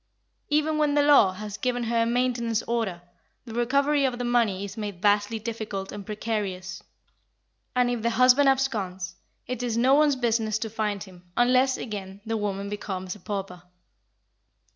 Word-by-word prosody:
Even 305 +1 +1
when 295 -1 +2
the 290 - +4
law 280 -10 +6
has 205 +1 -7
given 245 -1 -1
her 230 0 +1
a - - +3
maintenance 235 -2 0
order, 220 -7 -2 0.4
the 230 - -9
recovery 280 +5 +2
of 255 -2 0
the 245 - -3
money 225 -5 +1
is 200 0 -8
made 205 -4 -5
vastly 205 +3 +2
difficult 215 -3 -5
and 205 -2 -8
precarious, 200 -4 -3 0.9
and 250 -1 +3
if 240 -2 -2
the 235 - +1
husband 255 +4 +5
absconds, 200 -9 -1 0.3
it 250 -1 -4
is 235 -2 -1
no 255 +3 +4
one's 295 -1 +4
business 225 -3 0
to 220 -1 -4
find 210 -3 -2
him, 180 -2 -16
unless, 255 +2 +4
again, 200 -3 -6
the 225 0 -2
woman 200 -2 -2
becomes 190 -3 -4
a 210 - -13
pauper. 195 -4 -5
225 Hz, 165 wpm, -26 LUFS, 200-250 Hz, 0.9 s, law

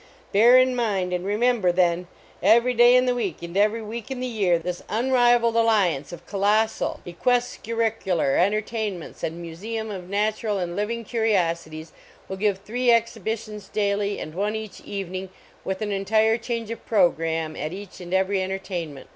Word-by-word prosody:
Bear 235 +5 +7
in 255 0 +4
mind 195 -7 0
and 180 0 -2
remember, 210 -1 +2
then! 175 0 +1 0.3
Every 235 +5 +4
day 240 +1 +6
in 250 0 +5
the 250 - +2
week, 200 -9 -3
and 170 +1 -7
every 215 +3 +2
week 225 +2 -7
in 265 -2 -4
the 255 - -2
year, 200 -8 +1
this 175 +1 -5
unrivaled 240 0 +3
alliance 205 -11 +2
of 175 0 -10
colossal 210 +4 0
cquescur 230 +5 -1
ricular 210 -10 +1
entertainment 210 -2 -1
and 165 +2 -3
museum 215 +7 -5
of 185 -3 -7
natural 210 +1 0
and 175 -2 -3
living 230 +4 -2
curiosities 170 -8 -1 0.4
will 190 - -5
give 200 -1 +1
three 240 +6 -3
exhibi 230 -2 +2
tions 210 -2 -10
daily 205 -1 0
and 155 - -7
one 205 +4 -1
each 220 -2 -7
evening 190 -1 -5 0.3
with 190 +3 -3
an 210 - -2
entire 220 +3 +2
change 230 -1 -4
of 230 - -7
programme 165 -6 +1
at 155 - -4
each 195 0 -9
and 175 0 -9
every 190 +1 +1
entertainment. 180 -6 -5
205 Hz, 165 wpm, -24 LUFS, 180-230 Hz, 0.4 s, Bear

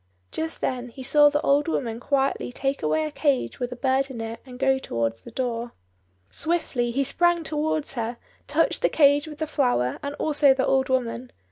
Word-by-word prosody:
Just 320 0 -4
then 250 -1 -2
he 260 +3 -10
saw 295 +2 +6
the 295 0 0
old 285 +2 +2
woman 235 -8 -2
quietly 270 -1 0
take 270 +2 -2
away 155 0 +1
a 155 - -4
cage 280 - 0
with 245 -1 -3
a - - -5
bird 265 +2 +1
in 255 -3 -7
it, 225 0 -5
and 250 -1 -10
go 265 0 +2
towards 115 - -2
the - - -11
door. 235 -1 -3 0.6
Swiftly 315 -7 -1
he 270 +4 0
sprang 340 +5 +2
towards 310 -1 -1
her, 235 -1 -3 0.3
touched 320 +3 +1
the - - +3
cage 290 0 +4
with 300 -1 -9
the 315 - -2
flower, 245 - 0
and 285 0 -4
also 290 -3 +3
the 265 - +1
old 265 0 +2
woman. 250 -1 -1
265 Hz, 200 wpm, -25 LUFS, 240-290 Hz, 0.6 s, saw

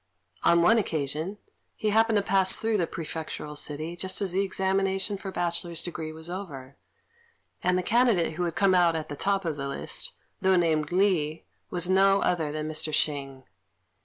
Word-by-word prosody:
On 170 0 +4
one 225 +6 +5
occasion, 160 +1 -2 0.4
he 215 - -1
happened 225 +1 +3
to 205 - +2
pass 190 -1 +5
through 225 -1 0
the 170 -4 0
prefectural 155 -2 -6
city 155 +3 -3
just 185 +1 -1
as 195 -3 -1
the 190 +2 +1
examination 195 +1 0
for 195 0 -7
bachelor's 170 -2 -1
degree 160 -2 -5
was 160 +1 -9
over; 145 -8 -7 0.9
and 180 0 +2
the 185 - -1
candidate 220 -6 +2
who 175 +3 -2
had 170 - -3
come 195 -1 +3
out 175 -2 +4
at 160 -1 -4
the 145 - -5
top 195 +4 0
of 160 -3 -2
the 140 0 -4
list, 140 - -1 0.3
though 190 0 +4
named 160 -3 +1
Li, 175 -5 +1 0.2
was 175 -1 -1
no 195 +1 +4
other 160 -4 0
than 155 0 -4
Mr. 155 0 -2
Hsing. 140 -3 -2
175 Hz, 180 wpm, -27 LUFS, 155-195 Hz, 0.9 s, one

